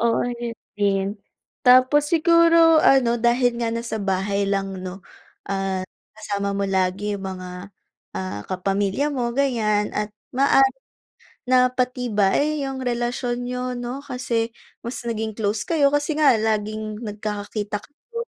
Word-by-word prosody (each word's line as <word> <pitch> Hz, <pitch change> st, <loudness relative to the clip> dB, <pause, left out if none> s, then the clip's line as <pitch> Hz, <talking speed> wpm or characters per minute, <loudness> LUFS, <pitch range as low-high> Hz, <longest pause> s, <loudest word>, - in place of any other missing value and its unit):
Oo, 230 Hz, 0 st, +2 dB
'yun 240 Hz, -1 st, -4 dB, 0.2 s
din, 195 Hz, -1 st, +1 dB, 0.6 s
tapos 255 Hz, +3 st, +6 dB
siguro 335 Hz, 0 st, +6 dB
ano 245 Hz, -3 st, +5 dB
dahil 240 Hz, +1 st, +2 dB
nga 230 Hz, -1 st, 0 dB
nasa 230 Hz, -1 st, -3 dB
bahay 200 Hz, 0 st, 0 dB
lang 195 Hz, -1 st, -1 dB
'no, 185 Hz, +1 st, -7 dB, 0.5 s
at 195 Hz, -1 st, -2 dB, 0.3 s
kasama 200 Hz, -2 st, -2 dB
mo 200 Hz, 0 st, -1 dB
lagi 190 Hz, +2 st, 0 dB
'yung 195 Hz, -, -8 dB
mga, 185 Hz, +1 st, -7 dB, 0.4 s
ah, 95 Hz, +2 st, -4 dB
kapamilya 195 Hz, +8 st, 0 dB
mo 245 Hz, -4 st, -2 dB
ganiyan 225 Hz, -6 st, +1 dB
at 210 Hz, 0 st, -2 dB, 0.2 s
maaaring 270 Hz, -1 st, +4 dB, 0.6 s
napatibay, 250 Hz, +1 st, +1 dB
'yung 270 Hz, -1 st, -4 dB
relasyon 245 Hz, 0 st, -2 dB
niyo 250 Hz, 0 st, -3 dB
'no, 245 Hz, +2 st, -5 dB
kasi 250 Hz, -4 st, -2 dB, 0.3 s
mas 235 Hz, +2 st, -6 dB
naging 220 Hz, -2 st, -3 dB
close 210 Hz, -1 st, -1 dB
kayo 290 Hz, -4 st, +3 dB
kasi 290 Hz, +1 st, 0 dB
nga 290 Hz, -5 st, +5 dB
laging 215 Hz, 0 st, -2 dB
nagkikita 210 Hz, 0 st, -4 dB
kayo. 465 Hz, +11 st, -8 dB
230 Hz, 125 wpm, -23 LUFS, 200-255 Hz, 0.6 s, tapos